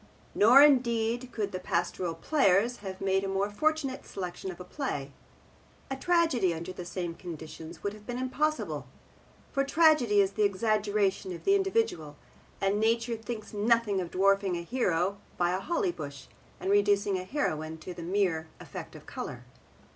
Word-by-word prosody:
Nor 245 Hz, +7 st, +8 dB
indeed 245 Hz, -3 st, +3 dB
could 205 Hz, -3 st, -2 dB
the 185 Hz, -, -4 dB
Pastoral 175 Hz, -1 st, -1 dB
Players 230 Hz, -, +2 dB
have 190 Hz, -2 st, -7 dB
made 195 Hz, 0 st, +1 dB
a -, -, -2 dB
more 195 Hz, +1 st, 0 dB
fortunate 285 Hz, +2 st, 0 dB
selection 180 Hz, 0 st, -6 dB
of 185 Hz, -, -8 dB
a -, -, -6 dB
play. 180 Hz, -, -4 dB, 0.8 s
A -, -, 0 dB
tragedy 270 Hz, -, +2 dB
under 170 Hz, +3 st, -6 dB
the 180 Hz, -, -7 dB
same 175 Hz, -1 st, -4 dB
conditions 160 Hz, -1 st, -9 dB
would 200 Hz, -, -1 dB
have 210 Hz, 0 st, -14 dB
been 245 Hz, 0 st, -3 dB
impossible. 300 Hz, +5 st, -1 dB, 0.6 s
For 275 Hz, -, +1 dB
tragedy 280 Hz, -8 st, +4 dB
is 195 Hz, -1 st, +4 dB
the 215 Hz, -, -3 dB
exaggeration 205 Hz, -1 st, +1 dB
of -, -, -11 dB
the 390 Hz, -, +4 dB
individual, 385 Hz, -, 0 dB, 0.4 s
and 195 Hz, +1 st, +1 dB
nature 230 Hz, +2 st, +1 dB
thinks 225 Hz, -1 st, -7 dB
nothing 210 Hz, -2 st, +2 dB
of 175 Hz, -, -5 dB
dwarfing 195 Hz, 0 st, +2 dB
a 170 Hz, -, -5 dB
hero 195 Hz, -3 st, 0 dB, 0.2 s
by 175 Hz, 0 st, +2 dB
a 185 Hz, -, 0 dB
holly 345 Hz, -, 0 dB
bush, 140 Hz, -, -8 dB, 0.3 s
and 195 Hz, -, -1 dB
reducing 205 Hz, -1 st, +3 dB
a -, -, -5 dB
heroine 160 Hz, -, -2 dB
to 160 Hz, +3 st, -8 dB
a 170 Hz, -, -7 dB
mere 170 Hz, -3 st, 0 dB
effect -, -, -8 dB
of -, -, -12 dB
colour. -, -, -6 dB
200 Hz, 165 wpm, -29 LUFS, 180-245 Hz, 0.8 s, Nor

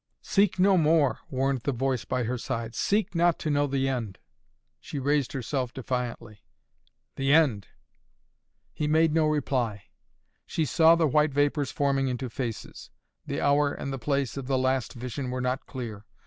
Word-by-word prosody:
"Seek 200 Hz, -2 st, +2 dB
no 190 Hz, +1 st, +4 dB
more!" 155 Hz, -3 st, +3 dB
warned 135 Hz, -2 st, 0 dB
the 140 Hz, -, -1 dB
voice 130 Hz, -1 st, -1 dB
by 125 Hz, -, -1 dB
her 125 Hz, +2 st, -2 dB
side. 115 Hz, -2 st, -4 dB
"Seek 205 Hz, -, 0 dB
not 170 Hz, -1 st, +3 dB
to 155 Hz, -, -2 dB
know 145 Hz, 0 st, +2 dB
the 135 Hz, -1 st, 0 dB
end!" 115 Hz, -7 st, -3 dB, 0.6 s
She -, -, -7 dB
raised 140 Hz, 0 st, 0 dB
herself 130 Hz, -1 st, -3 dB
defiantly. 125 Hz, -5 st, -4 dB, 0.7 s
"The 135 Hz, 0 st, +1 dB
end!" 145 Hz, -11 st, +3 dB, 1.1 s
He 150 Hz, -, -2 dB
made 160 Hz, +1 st, +3 dB
no 160 Hz, -1 st, +3 dB
reply. 125 Hz, -9 st, -1 dB, 0.6 s
She 160 Hz, -, -1 dB
saw 160 Hz, +4 st, +5 dB
the 165 Hz, -1 st, +2 dB
white 150 Hz, 0 st, +2 dB
vapors 145 Hz, -1 st, +1 dB
forming 140 Hz, -3 st, 0 dB
into 125 Hz, -1 st, -3 dB
faces. 120 Hz, -4 st, -6 dB, 0.4 s
The -, -, -2 dB
hour 145 Hz, 0 st, +3 dB
and 140 Hz, -1 st, -5 dB
the 135 Hz, -, -4 dB
place 140 Hz, 0 st, -1 dB
of 135 Hz, -2 st, -5 dB
the 135 Hz, -1 st, +1 dB
last 130 Hz, -1 st, 0 dB
vision 125 Hz, +2 st, -5 dB
were 125 Hz, 0 st, -3 dB
not 125 Hz, +2 st, -2 dB
clear. 115 Hz, -6 st, -7 dB
135 Hz, 165 wpm, -27 LUFS, 125-150 Hz, 1.1 s, saw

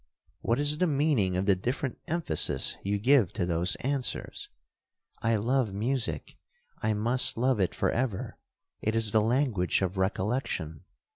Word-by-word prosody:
'—'What 115 Hz, -, 0 dB
is 145 Hz, +1 st, +3 dB
the 180 Hz, -, +3 dB
meaning 140 Hz, -, +1 dB
of 95 Hz, -, -1 dB
the 100 Hz, -1 st, +4 dB
different 125 Hz, +7 st, -3 dB
emphasis 160 Hz, -, +1 dB
you 100 Hz, +1 st, -1 dB
give 120 Hz, -2 st, +3 dB
to 90 Hz, -, -1 dB
those 90 Hz, +1 st, 0 dB
answers?'—'I 115 Hz, -, -4 dB
love 115 Hz, 0 st, 0 dB
music—I 130 Hz, -, -4 dB
must 120 Hz, +5 st, +2 dB
love 125 Hz, -1 st, +1 dB
it 95 Hz, -, 0 dB
for -, -, 0 dB
ever—it 110 Hz, -1 st, -5 dB
is 110 Hz, -2 st, +4 dB
the 110 Hz, -, +3 dB
language 115 Hz, -6 st, +1 dB
of 95 Hz, +1 st, -2 dB
recollection. 95 Hz, -, -2 dB
115 Hz, 135 wpm, -28 LUFS, 95-135 Hz, -, the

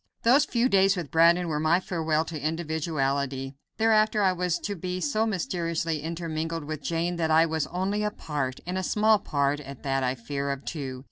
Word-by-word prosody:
Those 260 Hz, +6 st, +5 dB
few 240 Hz, +1 st, +1 dB
days 195 Hz, -3 st, +4 dB
with 170 Hz, -5 st, -5 dB
Brandon 170 Hz, +2 st, +4 dB
were 155 Hz, -2 st, -1 dB
my 160 Hz, +3 st, +3 dB
farewell 160 Hz, -4 st, -1 dB
to 155 Hz, -2 st, -3 dB
individuality. 140 Hz, -4 st, -2 dB, 0.2 s
Thereafter 215 Hz, -1 st, +3 dB
I 190 Hz, -1 st, +4 dB
was 180 Hz, -1 st, 0 dB
to 205 Hz, -, -4 dB
be 180 Hz, +1 st, -4 dB
so 225 Hz, 0 st, 0 dB
mysteriously 170 Hz, -5 st, -2 dB
intermingled 165 Hz, 0 st, -3 dB
with 155 Hz, 0 st, -5 dB
Jane 170 Hz, +3 st, -1 dB
that 160 Hz, -1 st, 0 dB
I 160 Hz, +1 st, +5 dB
was 160 Hz, -2 st, -1 dB
only 190 Hz, +4 st, -1 dB
a 210 Hz, -, +1 dB
part 145 Hz, -9 st, -4 dB
and 180 Hz, +2 st, -2 dB
a -, -, -1 dB
small 215 Hz, +2 st, +3 dB
part 140 Hz, -4 st, 0 dB
at 140 Hz, -2 st, -10 dB
that 135 Hz, -1 st, 0 dB
I 125 Hz, 0 st, 0 dB
fear 140 Hz, +3 st, -4 dB
of 140 Hz, 0 st, -4 dB
two. 135 Hz, -5 st, -5 dB
165 Hz, 195 wpm, -27 LUFS, 145-185 Hz, 0.2 s, Those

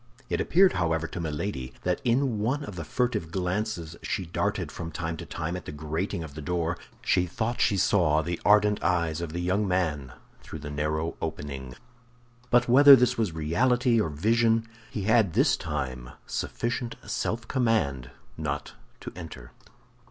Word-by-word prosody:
It -, -, +1 dB
appeared 185 Hz, +2 st, +4 dB
however 80 Hz, -2 st, 0 dB
to 85 Hz, -, -6 dB
Milady 75 Hz, -5 st, -4 dB
that 90 Hz, -1 st, 0 dB
in 125 Hz, -2 st, +1 dB
one 130 Hz, +8 st, 0 dB
of 100 Hz, -9 st, -7 dB
the 85 Hz, -, -5 dB
furtive 120 Hz, -, -1 dB
glances 90 Hz, -2 st, -2 dB
she 95 Hz, -, -2 dB
darted 85 Hz, -, -2 dB
from 85 Hz, -1 st, -6 dB
time 80 Hz, +1 st, -3 dB
to -, -, -8 dB
time 85 Hz, +2 st, -3 dB
at 90 Hz, -, -7 dB
the -, -, -6 dB
grating 80 Hz, +5 st, -3 dB
of 75 Hz, -3 st, -9 dB
the 75 Hz, -, -7 dB
door 85 Hz, +2 st, -1 dB, 0.3 s
she 90 Hz, 0 st, +2 dB
thought 110 Hz, +6 st, -2 dB
she 100 Hz, -, +3 dB
saw 85 Hz, -5 st, +3 dB
the 85 Hz, +2 st, -3 dB
ardent 105 Hz, 0 st, +4 dB
eyes 85 Hz, -2 st, 0 dB
of 85 Hz, -2 st, -4 dB
the 85 Hz, -, -4 dB
young 95 Hz, +4 st, +1 dB
man 80 Hz, -8 st, -1 dB, 0.3 s
through -, -, -8 dB
the 75 Hz, -1 st, -7 dB
narrow 75 Hz, +2 st, -2 dB
opening. 70 Hz, -5 st, -5 dB, 0.7 s
But 120 Hz, 0 st, +4 dB
whether 140 Hz, +3 st, +9 dB
this 125 Hz, -1 st, +2 dB
was 110 Hz, -7 st, -1 dB
reality 120 Hz, -, +2 dB
or 85 Hz, -, -1 dB
vision, 115 Hz, +8 st, +2 dB, 0.2 s
he 105 Hz, -, -4 dB
had 110 Hz, -4 st, +3 dB
this -, -, +4 dB
time 65 Hz, -6 st, -4 dB, 0.2 s
sufficient 120 Hz, 0 st, -3 dB
self 115 Hz, 0 st, -2 dB
command 110 Hz, -, 0 dB, 0.3 s
not 75 Hz, -2 st, -3 dB, 0.3 s
to -, -, -7 dB
enter. 80 Hz, -8 st, -9 dB
85 Hz, 165 wpm, -27 LUFS, 80-110 Hz, 0.7 s, whether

